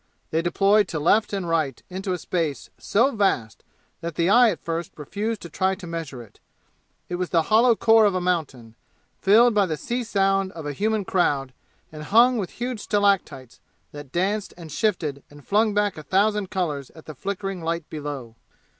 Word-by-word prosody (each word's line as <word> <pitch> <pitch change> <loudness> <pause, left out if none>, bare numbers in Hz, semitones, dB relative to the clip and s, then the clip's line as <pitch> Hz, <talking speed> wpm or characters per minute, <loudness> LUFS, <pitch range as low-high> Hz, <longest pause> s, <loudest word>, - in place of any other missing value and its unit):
They 160 - +1
deployed 195 +4 +3
to 160 - -4
left 205 +8 +3
and 195 -3 -3
right 155 -6 0
into 190 +1 -4
a 180 - 0
space 165 -5 -3
so 235 +5 +2
vast 190 - 0 0.4
that 170 -1 -5
the 170 +3 +2
eye 245 +1 +7
at 185 - -3
first 165 0 -3
refused 205 +9 -4
to - - -6
try 190 +2 0
to 190 -1 -11
measure 165 -7 -6
it. 110 - -20 0.7
It 175 - -3
was 180 -1 -2
the 165 -2 +2
hollow 235 +1 +6
core 225 0 +5
of 200 -2 +2
a - - +1
mountain, 155 -11 -2 0.5
filled 225 +5 +5
by 205 -2 +3
the 155 -2 -3
sea 240 - -3
sound 195 -3 +1
of 160 -2 -8
a 145 - -3
human 215 +4 -1
crowd 140 -9 0 0.4
and 155 -1 -9
hung 235 +9 +4
with 190 - -3
huge 245 -1 -4
stalactites 195 - 0 0.3
that 145 -2 -10
danced 195 +5 -1
and 165 -3 -10
shifted 155 -7 -1
and 145 -1 -16
flung 210 +1 +2
back 205 -5 0
a - - -7
thousand 200 +4 +1
colors 150 -8 -3
at 160 - -14
the 155 - -8
flickering 195 +4 -4
light 165 -1 -2
below. 145 -6 -6
180 Hz, 190 wpm, -24 LUFS, 155-205 Hz, 0.7 s, eye